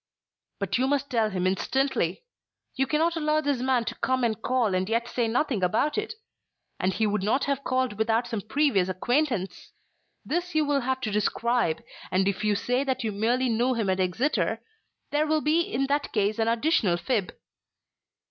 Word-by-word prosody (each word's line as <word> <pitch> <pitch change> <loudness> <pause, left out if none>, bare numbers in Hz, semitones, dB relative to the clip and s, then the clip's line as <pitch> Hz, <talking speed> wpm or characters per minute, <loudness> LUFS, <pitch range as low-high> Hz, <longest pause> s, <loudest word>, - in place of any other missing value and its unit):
"But 200 +4 -1
you 260 - +2
must 280 0 -1
tell 225 -3 +2
him 185 -2 -2
instantly. 265 - 0 0.5
You 270 0 0
cannot 325 +2 +1
allow 305 -1 +1
this 285 -4 -1
man 255 -2 +1
to - - -3
come 260 -1 -1
and 225 -2 0
call 245 -6 +1
and 185 +2 0
yet 230 +1 0
say 240 -1 -1
nothing 240 -2 0
about 215 +11 +1
it. 425 +1 -3 0.6
And 185 - +1
he 220 +4 0
would 210 -1 0
not 220 +8 +1
have 280 -1 -1
called 255 -5 -1
without 225 +2 +2
some 230 -4 -3
previous 220 -5 +1
acquaintance. 235 +1 -1 0.5
This 350 +1 -2
you 310 -1 +3
will 285 -1 +1
have 260 +1 -1
to 220 - -2
describe, 210 -2 0 0.3
and 190 +1 +1
if 200 +1 -1
you 210 -1 +2
say 250 +5 0
that 260 -2 -2
you 220 - -1
merely 235 +5 +1
knew 245 +2 +1
him 215 -5 0
at 185 - -1
Exeter, 205 - 0 0.5
there 300 +1 +1
will 310 0 +2
be 310 +3 +3
in 275 -5 -1
that 285 +1 -1
case 210 +1 0
an 225 - +2
additional 230 - +2
fib." 205 +1 -1
240 Hz, 185 wpm, -26 LUFS, 210-280 Hz, 0.6 s, you